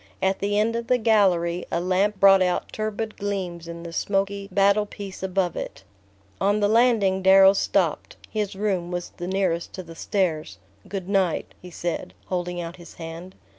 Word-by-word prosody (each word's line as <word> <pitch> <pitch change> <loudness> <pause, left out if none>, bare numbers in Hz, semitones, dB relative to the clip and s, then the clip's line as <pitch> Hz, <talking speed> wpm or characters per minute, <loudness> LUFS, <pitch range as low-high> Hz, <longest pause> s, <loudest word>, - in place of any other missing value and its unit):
At 190 0 +1
the 205 +1 0
end 220 +2 +2
of 235 0 -3
the 250 - +3
gallery, 185 -7 +2
a - - +1
lamp 190 +3 +1
brought 195 -1 +7
out 180 -1 0
turbid 215 0 -3
gleams 185 -4 -4
in 170 0 -7
the 170 -1 -8
smoky 195 +1 -1
battle 200 +1 +3
piece 200 -2 -8
above 190 -1 0
it. - - -6 0.6
On 205 +2 +2
the 205 - +3
landing 215 -4 +3
Darrow 190 +1 +7
stopped; 200 - 0
his 210 -3 -3
room 190 -4 -1
was 175 -1 -4
the 175 - -5
nearest 185 -3 -1
to 185 - -6
the 165 -1 -11
stairs. 160 - -1 0.3
"Good 190 -2 -5
night," 190 -4 0
he 180 - -10
said, 170 - -4
holding 180 -1 -2
out 170 +1 -6
his 175 -1 -13
hand. 165 +3 -8
190 Hz, 175 wpm, -24 LUFS, 175-205 Hz, 0.6 s, brought